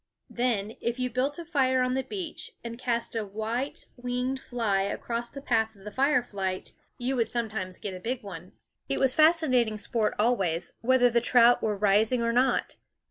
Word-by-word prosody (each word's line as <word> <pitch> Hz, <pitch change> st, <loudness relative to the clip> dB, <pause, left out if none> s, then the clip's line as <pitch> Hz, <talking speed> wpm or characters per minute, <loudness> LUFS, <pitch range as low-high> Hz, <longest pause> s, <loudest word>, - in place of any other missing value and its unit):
Then, 225 Hz, -4 st, -1 dB
if 235 Hz, +1 st, -1 dB
you 250 Hz, -1 st, -1 dB
built 265 Hz, +4 st, 0 dB
a 340 Hz, -, -7 dB
fire 260 Hz, -5 st, +2 dB
on 250 Hz, 0 st, 0 dB
the 265 Hz, -, +1 dB
beach 340 Hz, +5 st, -6 dB
and 235 Hz, 0 st, -7 dB
cast 235 Hz, -2 st, -1 dB
a 225 Hz, -, 0 dB
white 220 Hz, +7 st, -4 dB
winged 250 Hz, +2 st, -2 dB
fly 225 Hz, -7 st, 0 dB
across 235 Hz, +4 st, -3 dB
the 275 Hz, +2 st, -9 dB
path 225 Hz, -4 st, +1 dB
of 195 Hz, -, -18 dB
the 210 Hz, -, -7 dB
firelight, 225 Hz, -8 st, 0 dB, 0.3 s
you 255 Hz, +2 st, -1 dB
would 230 Hz, -3 st, +1 dB
sometimes 220 Hz, -6 st, -3 dB
get 200 Hz, -, -5 dB
a 185 Hz, -, -7 dB
big 240 Hz, +5 st, -3 dB
one. 185 Hz, -3 st, -9 dB, 0.4 s
It -, -, 0 dB
was 265 Hz, -1 st, +3 dB
fascinating 280 Hz, -8 st, +4 dB
sport 220 Hz, 0 st, 0 dB
always, 195 Hz, -7 st, +1 dB
whether 245 Hz, 0 st, +4 dB
the 235 Hz, 0 st, +3 dB
trout 240 Hz, 0 st, +5 dB
were 210 Hz, -2 st, 0 dB
rising 210 Hz, +4 st, +3 dB
or 230 Hz, 0 st, +1 dB
not. 250 Hz, +1 st, +1 dB
235 Hz, 185 wpm, -28 LUFS, 215-255 Hz, 0.4 s, trout